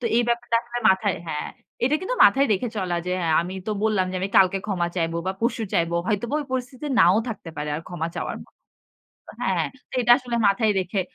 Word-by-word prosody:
তো -, -, -7 dB
এই 240 Hz, -, +4 dB
ব্যাপারটা 235 Hz, 0 st, +1 dB
আসলে 240 Hz, 0 st, -5 dB
মাথায় 190 Hz, 0 st, +2 dB
হ্যাঁ। 150 Hz, -2 st, -3 dB, 0.4 s
এটা 270 Hz, -, +2 dB
কিন্তু 380 Hz, +7 st, -2 dB
মাথায় 275 Hz, +1 st, +5 dB
রেখে 210 Hz, +5 st, -1 dB
চলা 185 Hz, -3 st, -1 dB
যে, 180 Hz, -, -1 dB, 0.3 s
"আমি 180 Hz, +2 st, -5 dB
তো 215 Hz, -, -1 dB
বললাম 215 Hz, -4 st, +2 dB
যে, 185 Hz, -, -4 dB
আমি 195 Hz, -, -1 dB
কালকে 195 Hz, 0 st, +5 dB
ক্ষমা 185 Hz, -4 st, 0 dB
চাইব 165 Hz, -1 st, 0 dB
বা 190 Hz, -, 0 dB
পরশু 230 Hz, 0 st, 0 dB
চাইব।" 170 Hz, 0 st, +1 dB, 0.2 s
হয়তোবা 230 Hz, +5 st, -1 dB
ওই -, -, -5 dB
পরিস্থিতিতে 255 Hz, +2 st, -4 dB
নাও 180 Hz, -1 st, +6 dB
থাকতে 210 Hz, -6 st, -6 dB
পারে। 150 Hz, 0 st, -4 dB
আর -, -, -5 dB
ক্ষমা 170 Hz, -2 st, -3 dB
চাওয়ার -, -, -4 dB
মত -, -, -28 dB, 0.9 s
হ্যাঁ। -, -, +1 dB, 0.4 s
এটা 240 Hz, 0 st, +1 dB
আসলে 245 Hz, -3 st, -4 dB
মাথায় 215 Hz, +2 st, +2 dB
রেখে 185 Hz, +2 st, -2 dB
205 Hz, 205 wpm, -24 LUFS, 180-240 Hz, 0.9 s, নাও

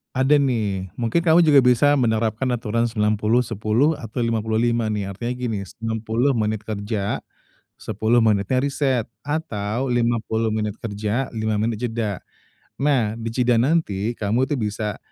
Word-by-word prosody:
Ada 135 Hz, +3 st, +4 dB
nih, 105 Hz, -8 st, 0 dB
mungkin 120 Hz, +7 st, 0 dB
kamu 170 Hz, 0 st, +5 dB
juga 150 Hz, -3 st, +6 dB
bisa 125 Hz, +2 st, +4 dB
menerapkan 110 Hz, +1 st, 0 dB
aturan 115 Hz, 0 st, -1 dB
90:10, 110 Hz, +5 st, +1 dB
atau 115 Hz, 0 st, -4 dB
50:5 115 Hz, 0 st, 0 dB
nih, 105 Hz, -2 st, -2 dB
artinya 120 Hz, +6 st, -4 dB
gini, 120 Hz, -4 st, -3 dB
90 115 Hz, +5 st, -1 dB
menit 110 Hz, -3 st, -1 dB
kerja, 105 Hz, -1 st, -3 dB, 0.6 s
10 115 Hz, +2 st, 0 dB
menitnya 110 Hz, +1 st, +2 dB
reset, 135 Hz, -3 st, 0 dB, 0.2 s
atau, 125 Hz, -6 st, -2 dB
50 115 Hz, -2 st, 0 dB
menit 105 Hz, -1 st, -2 dB
kerja, 105 Hz, +4 st, -2 dB
5 110 Hz, -1 st, -2 dB
menit 115 Hz, -1 st, -1 dB
jeda. 110 Hz, -4 st, -3 dB, 0.6 s
Nah, 130 Hz, -7 st, +1 dB
d 115 Hz, -, -8 dB
ijeda 125 Hz, +1 st, +2 dB
nanti 115 Hz, -, 0 dB
kamu 115 Hz, +5 st, 0 dB
itu -, -, +2 dB
bisa 105 Hz, 0 st, -3 dB
115 Hz, 135 wpm, -22 LUFS, 110-125 Hz, 0.6 s, juga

